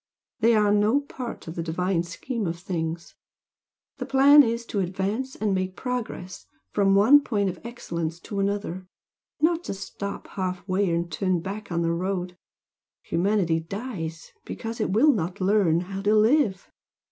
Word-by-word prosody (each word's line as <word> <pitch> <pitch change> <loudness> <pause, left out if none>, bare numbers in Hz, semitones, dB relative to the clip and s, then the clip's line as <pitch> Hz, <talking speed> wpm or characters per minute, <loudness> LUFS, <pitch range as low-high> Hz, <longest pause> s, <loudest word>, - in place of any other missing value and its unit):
They 230 +1 +4
are 210 -1 +4
no 210 +7 +3
part 255 -8 -7
of 160 - -5
the 170 - -4
divine 170 +2 0
scheme 205 +6 -4
of 165 0 -3
things. 170 -2 -4 0.9
The - - -4
plan 280 +2 +7
is 235 -2 0
to 210 - -3
advance 195 +8 -2
and 210 -2 0
make 185 0 -2
progress 240 -7 -5 0.2
from 195 -1 +3
one 245 +9 +7
point 205 -7 0
of 175 - -14
excellence 170 -8 -4
to 200 - -5
another, 195 -2 -2 0.5
not 335 +2 +2
to - - -3
stop 200 +1 -6
half 185 -1 -4
way 190 0 +1
and 170 0 -1
turn 185 -3 0
back 200 +3 -6
on 170 0 0
the 165 0 +1
road. 180 0 -2 0.7
Humanity 180 -3 +1
dies, 165 -3 -6
because 225 0 -5
it - - 0
will 270 +10 +5
not 180 -1 -3
learn 185 -4 +3
how 195 +2 -5
to 210 +2 +3
live." 215 -3 +3
195 Hz, 160 wpm, -25 LUFS, 175-220 Hz, 0.9 s, plan